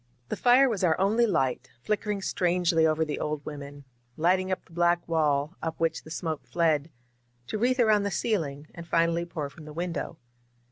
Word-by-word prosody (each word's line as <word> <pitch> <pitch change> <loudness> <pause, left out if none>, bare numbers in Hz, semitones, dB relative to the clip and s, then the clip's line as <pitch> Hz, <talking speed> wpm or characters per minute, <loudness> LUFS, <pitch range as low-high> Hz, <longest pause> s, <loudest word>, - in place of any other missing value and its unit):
The - - -1
fire 255 +2 +5
was 215 -7 -2
our 165 -2 +3
only 220 +5 +3
light, 135 - 0
flickering 210 -1 -1
strangely 175 -3 +2
over 160 0 +1
the 150 - -4
old 150 -1 -3
women; 145 -1 -8 0.3
lighting 185 +3 +2
up 185 - -3
the - - -20
black 175 0 +2
wall, 155 -1 +1
up 165 -1 -4
which 165 -1 0
the - - -12
smoke 160 -1 -4
fled, 160 -3 +1 0.6
to 215 - -4
wreathe 255 +3 +2
around 215 -3 +4
the 200 - -1
ceiling 160 -8 -2
and 170 -1 -9
finally 170 0 +1
pour 155 -4 -4
from 155 +2 -13
the 155 - -9
window. 170 0 -4
170 Hz, 185 wpm, -27 LUFS, 155-190 Hz, 0.6 s, fire